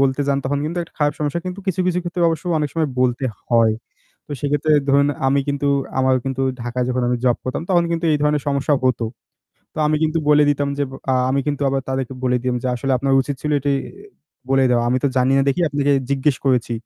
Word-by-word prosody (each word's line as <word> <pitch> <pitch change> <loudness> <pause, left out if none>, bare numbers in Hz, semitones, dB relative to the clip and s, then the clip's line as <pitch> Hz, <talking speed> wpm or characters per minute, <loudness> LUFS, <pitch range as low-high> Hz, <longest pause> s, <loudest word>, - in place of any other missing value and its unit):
বলতে 135 +1 +2
যান 140 - +2
তখন 140 +2 0
কিন্তু 170 +3 -3
একটা 170 - -13
খারাপ 145 0 +1
সমস্যা 150 +3 -1
কিন্তু 185 +2 -5
কিছু, 190 -1 0
কিছু 180 0 +1
ক্ষেত্রে 175 0 -3
অবশ্য 165 0 -3
অনেক 150 -1 -1
সময় 160 -2 0
বলতে 125 +1 +1 0.2
হয়। 115 -2 +4 0.5
তো - - -20
সেক্ষেত্রে 145 +1 +1 0.2
ধরুন 140 +1 +4 0.2
আমি 140 +1 +2
কিন্তু 140 0 -1 0.3
আমার 130 0 +3
কিন্তু 135 0 -2 0.2
ঢাকায় 120 +1 -2
যখন 125 0 0
আমি 125 - +1
জব 125 -2 +3
করতাম 130 +5 -3
তখন 175 -2 +4
কিন্তু 170 0 -1
এই 150 - +2
ধরনের 150 -1 +1
সমস্যা 140 +1 +1
হতো। 125 -2 +1 0.7
তো - - -7
আমি 155 0 +2
কিন্তু 160 +1 +1
বলে 150 0 +6
দিতাম 145 0 0
যে - - +1 0.3
আ - - +3 0.2
আমি 140 +1 +1
কিন্তু 145 -1 -1
আবার 135 0 0
তাদেরকে 130 -1 -3
বলে 125 -1 +2
দিম 125 -1 0
যে - - -2
আসলে 130 +2 -2
আপনার 135 +1 0
উচিত 140 +1 -3
ছিল 150 - -2
এটি 140 +1 -1 0.8
বলে 135 0 +4
দেওয়া। 120 -1 +3
আমি 125 +1 +2
তো - - +4
জানি 130 +1 +3
না 135 - +4
দেখি 140 - 0
আপনাকে 145 0 +1 0.2
জিজ্ঞেস 140 0 +1
করেছি। 125 -3 +1
140 Hz, 225 wpm, -20 LUFS, 130-150 Hz, 0.8 s, বলে